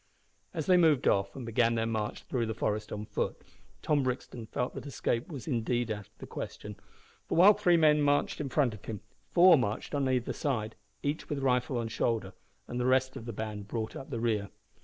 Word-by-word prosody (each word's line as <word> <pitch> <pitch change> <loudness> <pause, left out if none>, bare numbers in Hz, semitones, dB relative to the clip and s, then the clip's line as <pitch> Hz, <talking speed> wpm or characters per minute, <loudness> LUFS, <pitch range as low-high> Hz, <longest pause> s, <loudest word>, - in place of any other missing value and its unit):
As - - -3
they 185 -1 +5
moved 160 -6 +4
off 100 0 +2
and 130 - -6
began 115 0 +2
their 115 0 0
march 110 -1 -3
through 120 -4 -1
the 110 - -3
forest 105 0 -2
on 105 0 -4
foot, - - -2 0.4
Tom 150 -2 +2
Brixton 125 -3 -4
felt 125 +3 -2
that - - -7
escape 120 -3 -1
was 145 -5 -8
indeed 120 -3 0
out 105 -2 -5
of - - -38
the - - -9
question, 105 0 -7 0.5
for, - - -1
while 195 +5 +9
three 185 -5 +3
men 150 -2 +5
marched 145 +1 +1
in 140 - -3
front 130 -5 +2
of 105 - -12
him, 105 -3 -5 0.3
four 175 -3 +7
marched 110 +2 -2
on 140 -2 +1
either 125 -2 0
side, 115 -6 -2 0.3
each 145 +2 -2
with 150 - -1
rifle 125 -1 +1
on 115 -1 -1
shoulder, 110 -3 -1 0.3
and 120 - -4
the 125 - +1
rest 130 0 +2
of 115 - -7
the 120 - -4
band 105 -1 -5
brought 110 0 -4
up 135 - -8
the 120 -5 -3
rear. 110 -3 0
120 Hz, 215 wpm, -30 LUFS, 110-145 Hz, 0.5 s, while